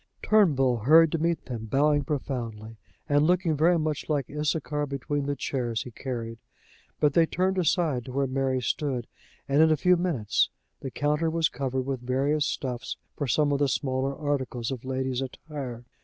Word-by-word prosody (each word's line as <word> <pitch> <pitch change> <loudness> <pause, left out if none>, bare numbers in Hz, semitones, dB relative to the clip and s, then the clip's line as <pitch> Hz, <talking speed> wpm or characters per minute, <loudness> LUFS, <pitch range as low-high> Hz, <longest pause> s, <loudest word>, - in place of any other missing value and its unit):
Turnbull 140 - +4
hurried 155 +8 +6
to 165 - 0
meet 165 0 0
them, 115 -4 -5
bowing 145 +5 +2
profoundly, 115 -7 -4 0.3
and 145 0 +3
looking 175 -3 +2
very 170 +4 +4
much 155 -2 -2
like 145 -4 -1
Issachar 150 0 -1
between 140 +1 -3
the 145 - 0
chairs 120 -4 -2
he 125 - -9
carried. 115 -2 -5 0.6
But 150 -1 +3
they 165 +1 +4
turned 185 +3 0
aside 160 -7 +1
to 130 - -7
where 135 +2 0
Mary 130 -1 0
stood, 125 -1 -1 0.4
and 140 +2 +3
in 160 - +6
a 155 - +3
few 180 +4 +4
minutes 155 - +1 0.3
the 135 - -5
counter 150 +4 0
was 160 -1 +1
covered 130 0 -2
with 135 -1 -3
various 140 +4 0
stuffs 125 -3 -4 0.2
for 145 - -2
some 145 +3 +2
of 140 - +1
the 145 -1 +2
smaller 135 0 -1
articles 130 -5 -2
of 125 -3 -5
ladies' 130 -1 -2
attire. 130 -3 -6
140 Hz, 175 wpm, -27 LUFS, 130-155 Hz, 0.6 s, hurried